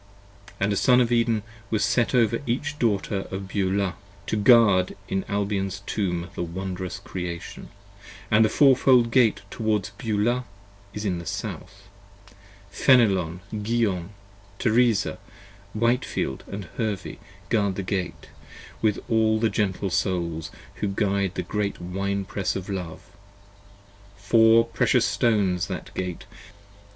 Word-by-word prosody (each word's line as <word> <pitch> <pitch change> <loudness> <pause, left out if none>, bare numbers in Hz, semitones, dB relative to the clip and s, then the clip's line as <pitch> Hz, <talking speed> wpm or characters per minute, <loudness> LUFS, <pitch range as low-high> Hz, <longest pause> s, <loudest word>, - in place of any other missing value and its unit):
And 100 +1 +1
a - - 0
Son 125 +4 +4
of 120 -1 +2
Eden 115 -3 +2 0.3
was 110 - +1
set 120 +1 +1
over 115 -2 +2
each 145 +5 -2
Daughter 100 -3 0
of 95 0 -5
Beulah, 95 -1 0 0.3
to - - -1
guard 105 -4 +5
In 95 0 -1
Albion's 100 -1 -2
Tomb 90 -4 -2
the - - -5
wondrous 95 +2 -4
Creation: 90 -3 -7 0.3
& - - -17
the 110 0 +5
Four 135 +2 +5
fold 125 -2 +4
Gate 115 -3 +3
50 - - -23
Towards 110 -3 0
Beulah 115 +3 0 0.5
is 105 - -6
to 90 -4 -1
the 85 - -9
South: 100 +1 -6 0.8
Fenelon, 95 - +3
Guion, 105 -4 -1 0.5
Teresa, 115 -2 +2 0.6
Whitefield 115 - -1 0.2
& 85 - -14
Hervey 105 -5 -3 0.3
guard 100 -4 +1
that 95 - -4
Gate, 95 -1 -4 0.5
with 105 -3 +2
all 110 -1 +2
the 115 0 +1
gentle 100 -2 -1
Souls 85 -4 -1 0.3
52 - - -16
Who 105 - 0
guide 100 -2 0
the - - -2
great 105 -1 -2
Wine 100 +2 -2
press 100 0 -2
of 95 0 -5
Love: 90 -4 -5 1.1
Four 115 +2 +5
precious 115 - +2
Stones 100 -5 +1
that 95 - -6
Gate: 90 -2 -4
p. - - -20
100 Hz, 135 wpm, -25 LUFS, 95-115 Hz, 1.1 s, guard